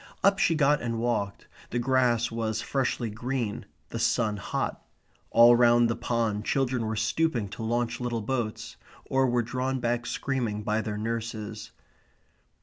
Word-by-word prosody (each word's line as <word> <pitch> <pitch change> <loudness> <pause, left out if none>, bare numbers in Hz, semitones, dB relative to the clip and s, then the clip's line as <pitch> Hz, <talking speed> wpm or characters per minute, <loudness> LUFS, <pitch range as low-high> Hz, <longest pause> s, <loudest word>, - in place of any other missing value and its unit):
Up 195 0 +4
she 165 - +3
got 150 -1 +3
and 115 -1 -2
walked. 115 -4 -1 0.2
The 120 - -2
grass 120 -1 +2
was 115 -1 -2
freshly 125 -4 -1
green; 120 0 -3 0.2
the - - -4
sun 110 -3 +1
hot. 100 - -3 0.5
All 120 +1 +7
round 120 -1 +5
the - - -1
pond 115 -3 -1
children 125 -2 0
were 110 - -2
stooping 110 +1 0
to 115 - -8
launch 120 +1 -1
little 120 -3 -2
boats; 115 -2 -3 0.3
or 135 0 +2
were 120 -1 +1
drawn 130 +3 -2
back 120 0 -1
screaming 120 -6 -2
by 110 +1 0
their 105 -1 -4
nurses. 110 -1 -4
120 Hz, 150 wpm, -27 LUFS, 110-125 Hz, 0.5 s, All